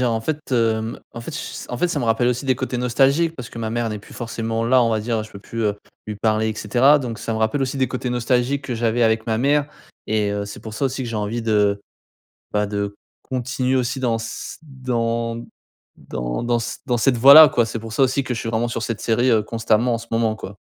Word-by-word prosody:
dire 120 -2 +2
en 110 - -1
fait, 150 +6 -2
hem, 115 -1 0
en 115 - -7
fait 120 - -7
ch 165 +2 -5
s - - -10
en 125 - -4
fait 180 - +2
ça - - -1
me - - -1
rappelle 115 +2 +2
aussi 125 +2 -1
des 130 -1 +2
côtés 130 0 -3
nostalgiques 135 +7 +2
parce 125 -4 -8
que - - -10
ma 110 -1 -3
mère 120 0 -1
n'est 105 -1 -4
plus 100 - -15
forcément 115 -1 -3
là. 125 +2 +4
On 115 - +2
va 110 - +1
dire 115 0 -1
je 110 - -11
peux 100 - -10
plus, 115 +3 -5
heu, 105 -1 0 0.3
lui 105 - -5
parler 110 +1 +1
et - - -5
cetera. 125 +8 +4
Donc 120 -5 -5
ça 115 - -3
me 110 - -2
rappelle 110 +5 +1
aussi 135 +1 -2
des 130 - +1
côtés 130 -1 -3
nostalgiques 125 +3 0
que 125 - -2
j'avais 115 +1 +1
avec 110 -1 +2
ma 110 -1 0
mère 145 +3 +2 0.4
et 105 -1 0
heu, 100 0 -2
c'est 100 - -9
pour 110 -1 -8
ça 135 - -2
aussi 130 0 -1
que 120 - -4
j'ai 115 - -3
envie 105 +3 -2
de 105 -2 +2 0.7
bah 105 0 +1
de 100 0 -3 0.3
continuer 130 0 -1
aussi 125 0 -1
dans 120 -3 +1
s 115 0 -6
dans 115 -4 -2 0.5
dans - - -4
dans 120 0 +1
s 115 +1 -5
dans 120 -1 0
cette 125 +2 +3
voie 135 +4 +8
là 155 +1 +11
quoi. 120 -3 +2
C'est 115 +1 -4
pour 110 0 -8
ça 135 - +2
aussi 135 +1 +2
que 130 -2 -3
je - - -4
suis 115 - -3
vraiment 115 +1 0
sur 115 -1 -3
cette 115 -2 -3
série, 120 +3 +2
heu, 110 -2 +4
constamment 115 +2 +1
en - - -1
ce 115 0 -11
moment 115 -1 +1
quoi. 100 -1 -9
115 Hz, 265 wpm, -21 LUFS, 110-125 Hz, 0.7 s, là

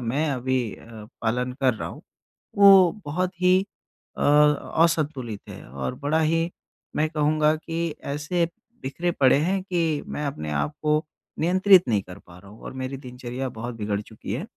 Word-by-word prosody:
मैं 135 +6 -1
अभी 130 0 0
अ, - - -16 0.4
पालन 125 +3 0
कर 130 -3 +3
रहा - - -5
हूँ - - -11 0.6
वो 195 -3 +8
बहुत 180 +5 -1
ही 180 0 +5 0.6
अ, - - -4 0.6
असंतुलित 145 -10 -1
है - - -9
और 65 0 -4
बड़ा 160 +2 +2
ही 165 +2 +1 0.5
मैं 155 +1 +1
कहूँगा 155 0 +2
कि 165 0 -3 0.2
ऐसे 165 +3 0 0.3
बिखरे 170 +7 -2
पड़े 135 +1 +6
हैं 185 +5 0
कि 165 -5 -1
मैं 150 - -4
अपने 75 - -5
आप 75 - -1
को 150 +1 +2 0.4
नियंत्रित 185 +1 +5
नहीं 105 -4 +2
कर 90 +1 -11
पा 85 0 -14
रहा 100 +2 -15
हूँ 110 - -15
और - - -7
मेरी 130 +1 -5
दिनचर्या 125 0 -6
बहुत 120 +2 -5
बिगड़ 105 -2 -2
चुकी 105 -1 -8
है। 140 +10 -3
145 Hz, 170 wpm, -24 LUFS, 120-165 Hz, 0.6 s, वो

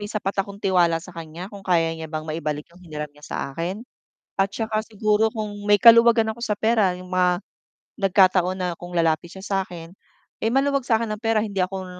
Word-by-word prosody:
may 205 - -5
sapat 200 -2 -3
akong 200 0 -10
tiwala 175 -3 +3
sa 180 - -11
kan'ya, 165 +3 -8
kung 200 - -9
kaya 165 -3 +2
niya 160 0 -7
bang 155 0 -4
maibalik 155 -1 -3
yung 175 - -18
hiniram 150 -2 -6
niya 150 0 -16
sa - - -5 0.2
akin 180 +7 -4 0.6
at 195 - +3
'tsaka 220 +1 -2
siguro 215 0 +1
kung 215 -1 -4 0.2
may 205 - +7
kaluwagan 230 0 +7
ako 235 - -14
sa 210 -3 -1
pera, 220 -5 +2
yung 185 - -11
mga 180 0 +2 0.6
nagkataon 185 -1 +3
na 180 -1 -2
kung 175 0 -8
lalapit 165 0 +1
siya 190 - -10
sa 195 -1 0
'kin, 170 -1 -10 0.5
eh, 225 - +2
maluwag 275 0 +2
sa'kin 230 -1 +2
ng 215 0 -5
pera, 225 -1 +1
hindi 200 -3 -4
ako 190 +1 -2
190 Hz, 205 wpm, -23 LUFS, 170-215 Hz, 0.6 s, may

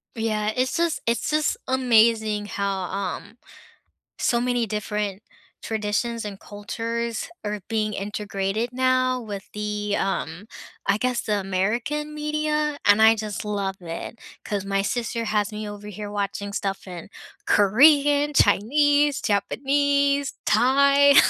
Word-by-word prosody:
Yeah, 215 -2 -1
it's 255 +1 0
just 335 -1 0
it's 235 0 0
just 305 -1 +1
amazing 225 -4 +3
how, 200 -1 -2
um, 195 +4 -5 0.8
so 235 -2 +1
many 245 -1 0
different 210 -1 -3 0.4
traditions 220 +2 -2
and 200 -2 -7
cultures 230 +3 -4 0.2
are 210 0 -3
being 215 -1 0
integrated 205 +2 -3
now 255 0 +2
with 205 -4 -7
the, 210 0 -2
um, 195 -1 -3 0.4
I 200 - +3
guess, 250 0 0
the 210 -1 0
American 235 +11 -2
media, 300 0 -1
and, 205 +1 +5
I 220 +1 +7
just 215 -2 -5
love 200 -2 -2
it, 170 +6 -7 0.3
'cause 200 -2 -3
my 195 0 0
sister 235 +1 -2
has 210 0 0
me 210 0 -5
over 205 0 -9
here 210 0 -7
watching 200 0 -3
stuff 195 -1 -3
in 175 -3 -8 0.4
Korean, 285 +7 +5
Chinese, 285 +7 +3
Japanese, 280 +6 +1
Thai. 280 +4 +5
220 Hz, 125 wpm, -24 LUFS, 205-260 Hz, 0.8 s, I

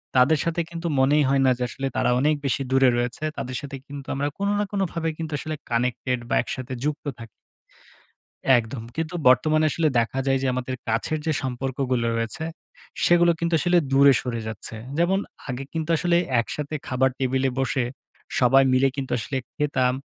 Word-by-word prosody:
তাদের 140 +4 +5
সাথে 170 0 0
কিন্তু 170 0 -4
মনেই 145 +3 +4
হয় 135 0 +3
না, 130 - +5
যে, 125 - -2
আসলে 135 +1 -3
তারা - - +2
অনেক 150 +2 +3
বেশি 135 +1 0
দূরে 135 -1 +5
রয়েছে। 125 +5 -2
তাদের 130 0 -4
সাথে 140 -1 -7
কিন্তু 140 -1 -8
আমরা 140 +1 0
কোনো 200 +1 0
না - - +2
কোনোভাবে 170 -5 -1
কিন্তু 160 -1 -5
আসলে 155 0 -4
কানেক্টেড 125 +1 0
বা - - +2
একসাথে 130 0 -5
যুক্ত 150 0 -2
থাকি 115 - -9 1.3
একদম। 115 0 -4
কিন্তু 165 +2 -3
বর্তমানে 155 +5 +4
আসলে 160 -2 +1
দেখা 115 +3 -1
যায়, 135 0 +3
যে, - - +1
আমাদের 130 0 -3
কাছের 115 +8 0
যে, 160 - +1
সম্পর্কগুলো 130 -1 -1
রয়েছে, 115 +8 -2 0.6
সেগুলো 175 0 +5
কিন্তু 170 0 -1
আসলে 175 +2 +3
দূরে 140 0 +7
সরে 115 -3 -3
যাচ্ছে। 110 +1 -6 0.2
যেমন 190 +3 +3 0.3
আগে 125 +2 -3
কিন্তু 160 0 -3
আসলে 175 0 +2 0.2
একসাথে 150 +5 -3
খাবার 130 +1 +2
টেবিলে 130 0 +1
বসে, 130 -2 0 0.5
সবাই 135 +2 +5
মিলে 130 +1 +4
কিন্তু 135 -2 -4
আসলে 135 +4 -3 0.2
খেতাম, 130 -4 +1
135 Hz, 175 wpm, -24 LUFS, 125-155 Hz, 1.3 s, দূরে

